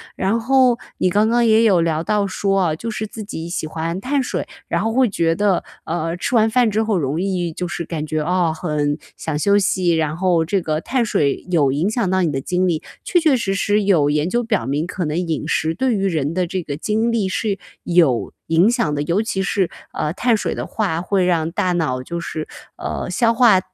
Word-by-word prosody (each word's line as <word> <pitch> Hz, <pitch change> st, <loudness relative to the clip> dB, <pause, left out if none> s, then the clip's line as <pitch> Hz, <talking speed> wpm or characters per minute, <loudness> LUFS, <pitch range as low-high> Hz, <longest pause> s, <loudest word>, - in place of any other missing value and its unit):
然 200 Hz, +5 st, 0 dB
后 250 Hz, 0 st, +3 dB, 0.2 s
你 185 Hz, -, +2 dB
刚 210 Hz, +4 st, +3 dB
刚 235 Hz, +1 st, +3 dB
也 220 Hz, 0 st, +5 dB
有 195 Hz, -6 st, +4 dB
聊 160 Hz, -1 st, 0 dB
到 210 Hz, +2 st, +1 dB
说 195 Hz, 0 st, 0 dB
啊， 155 Hz, -, 0 dB
就 230 Hz, +8 st, -5 dB
是 215 Hz, 0 st, -3 dB
自 215 Hz, +1 st, -8 dB
己 170 Hz, -5 st, -6 dB
喜 170 Hz, -2 st, -3 dB
欢 165 Hz, +3 st, -3 dB
碳 270 Hz, +5 st, 0 dB
水， -, -, -3 dB, 0.2 s
然 -, -, 0 dB
后 225 Hz, 0 st, -1 dB
会 255 Hz, -1 st, +3 dB
觉 165 Hz, -4 st, +1 dB
得， 200 Hz, -1 st, +1 dB, 0.2 s
呃， 165 Hz, 0 st, -2 dB
吃 210 Hz, -, -1 dB
完 220 Hz, -1 st, +4 dB
饭 240 Hz, -1 st, +3 dB
之 215 Hz, +2 st, +1 dB
后 215 Hz, -3 st, 0 dB
容 150 Hz, +1 st, -1 dB
易 185 Hz, -3 st, -1 dB
就 180 Hz, +3 st, -4 dB
是 170 Hz, -, -4 dB
感 155 Hz, -2 st, -4 dB
觉， 155 Hz, 0 st, -1 dB
啊， 175 Hz, -1 st, +1 dB
很 150 Hz, -3 st, -1 dB, 0.2 s
想 160 Hz, -2 st, -3 dB
休 200 Hz, +6 st, +3 dB
息， 185 Hz, -3 st, +1 dB
然 155 Hz, -1 st, 0 dB
后 175 Hz, -2 st, +2 dB
这 190 Hz, +3 st, 0 dB
个 155 Hz, -2 st, -1 dB
碳 255 Hz, +4 st, 0 dB
水 145 Hz, -10 st, 0 dB
有 150 Hz, -6 st, +3 dB
影 155 Hz, +8 st, 0 dB
响 220 Hz, -4 st, 0 dB
到 190 Hz, 0 st, +2 dB
你 170 Hz, -4 st, +1 dB
的 135 Hz, -, -2 dB
精 180 Hz, +5 st, 0 dB
力。 165 Hz, -3 st, 0 dB, 0.2 s
确 355 Hz, -, +2 dB
确 315 Hz, -5 st, +3 dB
实 205 Hz, -6 st, -1 dB
实 205 Hz, +1 st, +1 dB
有 170 Hz, -8 st, +3 dB
研 150 Hz, +3 st, +1 dB
究 240 Hz, +4 st, 0 dB
表 220 Hz, -4 st, 0 dB
明， 145 Hz, +4 st, -1 dB
可 180 Hz, -1 st, -3 dB
能 150 Hz, +1 st, -2 dB
饮 165 Hz, -3 st, -2 dB
食 160 Hz, +1 st, 0 dB
对 250 Hz, +6 st, 0 dB
于 195 Hz, -1 st, 0 dB
人 155 Hz, -4 st, -1 dB
的 180 Hz, +1 st, 0 dB
这 185 Hz, +2 st, -3 dB
个 145 Hz, -3 st, -5 dB
精 220 Hz, +7 st, 0 dB
力 220 Hz, -4 st, 0 dB
是 200 Hz, +1 st, -1 dB, 0.3 s
有 165 Hz, -9 st, +2 dB
影 165 Hz, +6 st, +4 dB
响 235 Hz, -11 st, 0 dB
的， 145 Hz, -, -1 dB
尤 170 Hz, +7 st, +1 dB
其 205 Hz, -3 st, -2 dB
是， 190 Hz, -2 st, 0 dB, 0.2 s
呃， 150 Hz, -, -2 dB
碳 235 Hz, +4 st, +2 dB
水 -, -, -2 dB
的 -, -, -4 dB
话 190 Hz, -7 st, -1 dB
会 185 Hz, 0 st, +1 dB
让 165 Hz, -2 st, +1 dB
大 180 Hz, +1 st, 0 dB
脑 145 Hz, -7 st, -1 dB
就 170 Hz, +6 st, -5 dB
是， 155 Hz, -2 st, -5 dB, 0.3 s
呃， -, -, -4 dB
消 230 Hz, -2 st, +2 dB
化 230 Hz, -5 st, +5 dB
180 Hz, 250 characters per minute, -20 LUFS, 160-215 Hz, 0.3 s, 也